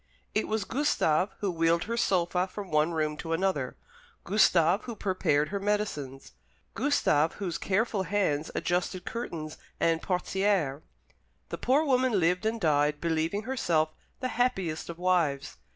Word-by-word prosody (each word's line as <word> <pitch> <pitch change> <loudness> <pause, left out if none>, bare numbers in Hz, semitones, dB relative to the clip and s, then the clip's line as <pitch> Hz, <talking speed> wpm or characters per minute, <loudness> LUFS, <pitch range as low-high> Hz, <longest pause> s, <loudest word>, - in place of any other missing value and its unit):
It 215 - 0
was 220 -2 -1
Gustave 205 - +1
who 200 -2 0
wheeled 165 0 +2
her 230 - -3
sofa 180 -4 +1
from 195 -1 -8
one 155 +2 +3
room 155 -2 -1
to 165 +1 -4
another, 190 +3 -1 0.5
Gustave 185 -2 +3
who 235 -2 -5
prepared 155 -7 +1
her 200 +1 -2
medicines, 195 -10 -2 0.4
Gustave 165 - +2
whose 185 -5 -3
careful 205 +1 0
hands 180 -6 0
adjusted 180 +1 -1
curtains 165 -10 -5 0.2
and 165 0 +2
portières. 180 -5 0 0.7
The - - -5
poor 280 +5 +3
woman 255 -6 +2
lived 180 +5 +1
and 225 +1 -1
died 150 -3 +2
believing 165 +5 -1
herself 175 -11 +1 0.3
the 255 - -1
happiest 190 -12 -1
of 170 - -6
wives. 170 -6 0
180 Hz, 140 wpm, -28 LUFS, 160-210 Hz, 0.7 s, one